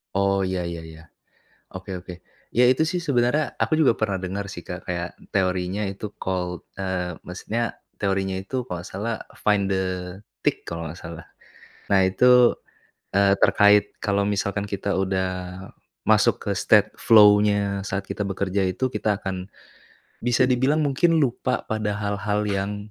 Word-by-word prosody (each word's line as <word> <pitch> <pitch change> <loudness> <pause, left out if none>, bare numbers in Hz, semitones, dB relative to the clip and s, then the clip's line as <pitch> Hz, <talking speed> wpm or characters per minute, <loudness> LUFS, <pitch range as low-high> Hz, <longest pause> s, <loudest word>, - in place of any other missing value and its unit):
Oh 100 0 +2
ya 90 -2 -2
ya 85 -1 -6
ya. 80 0 -12 0.7
Oke 95 0 -6
oke. 90 +1 -9 0.4
Iya 125 +1 +5
itu 145 +5 +2
sih 175 +2 -2
sebenarnya, 140 +1 +1
aku - - 0
juga 125 -6 +4
pernah 110 -3 0
dengar 100 +2 -4
sih 85 - -7
Kak, 90 0 -8
kayak, 85 0 -2 0.3
teorinya 90 +1 0
itu 100 +2 -7
called, 90 -1 -3 0.2
eee, 90 -3 -2
maksudnya 115 +6 -3 0.2
teorinya 95 -1 0
itu 125 +7 -3
kalau 90 -7 -5
enggak 95 - -10
salah 110 +4 -2 0.2
find 105 -2 +1
the 95 -1 -3 0.3
tick, - - +1
kalau 85 -1 -5
enggak 80 +3 -9
salah. 85 0 -8 0.7
Nah 95 - +6
itu, 125 +4 +5 0.6
eee, 100 0 +4
terkait 105 0 +5 0.2
kalau 100 0 +1
misalkan 100 0 -1
kita 100 0 -2
udah 95 -1 0 0.8
masuk - - +4
ke - - -4
state - - +4
flow-nya 105 -2 +5
saat 100 0 -3
kita 105 - -3
bekerja 100 0 -1
itu, 95 +8 0
kita 105 -5 -1
akan, 95 0 -5 0.7
bisa 120 +1 +1
dibilang 135 +5 +2
mungkin 160 +4 +2
lupa 125 0 0
pada 105 -1 -1
hal-hal 105 0 -1
yang 100 +1 -3
100 Hz, 150 wpm, -24 LUFS, 95-110 Hz, 0.8 s, Nah